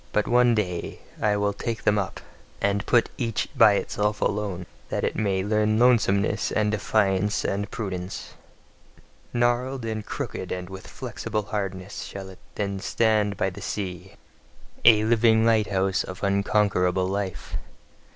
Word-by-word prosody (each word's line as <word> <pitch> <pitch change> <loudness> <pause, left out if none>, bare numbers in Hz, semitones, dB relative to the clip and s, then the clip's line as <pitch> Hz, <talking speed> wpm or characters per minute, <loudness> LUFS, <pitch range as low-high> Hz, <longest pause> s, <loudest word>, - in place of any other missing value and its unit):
But 105 - +1
one 120 -1 +4
day 90 -5 -2 0.2
will 105 -1 +1
I - - -7
take 115 -2 -3
them 105 0 +3
up, 100 - -4 0.4
and 100 0 +1
put 120 -2 +3
each 115 -4 -1
by 105 - +7
itself 105 +1 -1
alone: 100 -4 -1 0.2
that - - -2
it - - 0
may 100 -3 0
learn 105 +1 +2
lonesomeness 110 -3 +3
and 105 -1 +1
defiance 105 -1 +1
and 100 +1 -1
prudence. 95 -5 -5 1.0
Gnarled 120 +1 0
and 110 -1 -3
crooked - - -5
and 90 0 -4
with 95 0 -9
flexible 105 -1 -4
hardness 100 -2 -4
shall 95 -1 -7
it 95 - -13 0.2
then 100 -2 -2
stand 105 -1 +1
by 95 - 0
the - - -10
sea, 95 -2 -5 0.7
a 110 -2 +7
living 110 0 +4
lighthouse 100 -4 +2
of 95 +2 -9
unconquerable 100 -2 +2
life. 95 -1 -4
105 Hz, 140 wpm, -25 LUFS, 95-110 Hz, 1.0 s, by